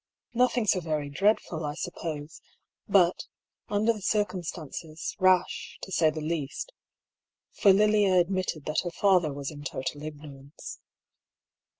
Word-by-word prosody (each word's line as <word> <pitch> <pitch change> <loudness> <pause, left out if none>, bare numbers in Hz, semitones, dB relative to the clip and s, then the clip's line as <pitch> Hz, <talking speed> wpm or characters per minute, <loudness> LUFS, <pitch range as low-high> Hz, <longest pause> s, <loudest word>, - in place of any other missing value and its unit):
" - - -66
Nothing 245 -1 +2
so 195 -2 +3
very 155 -4 -2
dreadful, 175 -1 +1
I 150 0 -3
suppose; 160 -3 -5 0.5
but, 185 -3 +3 0.4
under 215 +2 +2
the 215 - -9
circumstances, 175 -6 -3
rash, 185 -1 +2
to 190 - -7
say 165 -3 +4
the 155 0 -4
least 155 - -3 0.4
— - - -65
for 200 - +8
Lilia 205 -2 +4
ad 175 +2 +1
mitted 185 -5 -2
that 155 - 0
her 175 - -2
father 180 -3 +3
was 140 +1 -5
in 145 -1 -9
total 145 +1 -4
ignorance. 145 -2 -9
170 Hz, 140 wpm, -28 LUFS, 150-195 Hz, 0.5 s, for